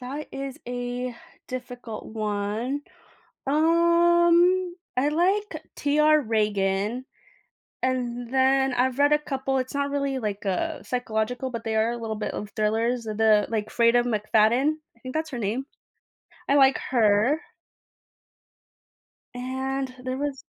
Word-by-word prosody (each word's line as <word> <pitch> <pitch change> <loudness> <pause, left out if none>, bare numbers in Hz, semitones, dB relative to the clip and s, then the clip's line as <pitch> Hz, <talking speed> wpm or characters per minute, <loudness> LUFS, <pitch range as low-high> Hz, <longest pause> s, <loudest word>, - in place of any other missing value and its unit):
that 275 +4 -6
is 270 -1 -5
a 245 0 -4 0.3
difficult 245 -3 -7
one. 215 +5 -2 0.6
Um, 345 +3 +4 0.2
I 270 - +3
like, 380 +7 0
T. 290 +1 0
R. 305 0 +5
Ragan. 210 0 0 0.8
And 245 -2 -2
then, 265 0 +3
I've 250 +1 +1
read 290 +1 +4
a 300 - +5
couple 270 -2 -2
it's 255 +2 -3
not 280 0 0
really, 280 -1 -1
like, 210 -3 -4
uh, 310 - -1
psychological, 245 +1 -2
but 230 -2 -6
they 220 -1 -1
are 220 +1 +2
a 240 - -4
little 225 -2 -4
bit 210 - -3
of 205 - -5
thrillers. 225 +3 0
The, 215 -1 +3
like, 220 -2 -1
Freida 235 0 +4
McFadden. 225 +4 +2 0.2
I - - -27
think 255 +1 -8
that's 315 0 -2
her 255 - -5
name. 230 +5 -2 0.8
I 280 - +4
like 270 -1 +5
her. 225 +3 +3 2.0
And 265 +1 -3
there 255 0 -2
was 280 -1 -3
255 Hz, 135 wpm, -25 LUFS, 225-280 Hz, 2.0 s, R